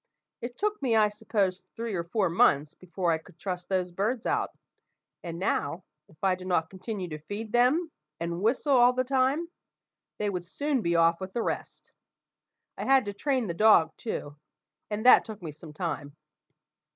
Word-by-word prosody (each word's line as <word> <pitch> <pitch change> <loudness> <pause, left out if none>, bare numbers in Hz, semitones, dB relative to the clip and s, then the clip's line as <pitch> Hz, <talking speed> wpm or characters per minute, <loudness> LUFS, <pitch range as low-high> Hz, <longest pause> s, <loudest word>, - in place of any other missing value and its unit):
It 240 +1 -6
took 420 -2 -1
me, 245 -4 +2
I 215 -1 +5
suppose, 200 -3 -1
three 230 -1 -4
or 170 -3 -1
four 195 +6 0
months 155 -3 +3
before 180 0 -2
I 160 - +1
could 160 - -19
trust 180 -2 -5
those 185 -2 0
birds 215 +7 -1
out; - - -1 0.7
and 170 -1 -5
now, 170 -2 -1 0.2
if 155 -1 -24
I 190 -1 +4
did 185 0 -6
not 165 -3 +1
continue 190 0 -5
to 155 -1 -6
feed 205 +7 -6
them, 265 +8 +3 0.3
and 170 +1 -3
whistle 255 +6 +2
all 245 0 +6
the 255 0 +1
time, 270 +5 +1 0.7
they 210 -1 -1
would 180 -2 -3
soon 285 - -1
be 170 -3 0
off 165 +1 +4
with 190 0 -6
the 235 - -1
rest. - - -5 0.9
I - - -2
had 270 -2 +4
to 205 - -4
train 260 +3 0
the 170 - -3
dog, 170 -5 +5
too; 150 -10 -5 0.5
and 215 +2 -3
that 255 - +8
took 220 -2 -8
me 165 -4 -6
some 155 +1 -12
time. 150 -3 -4
195 Hz, 185 wpm, -28 LUFS, 170-240 Hz, 0.9 s, that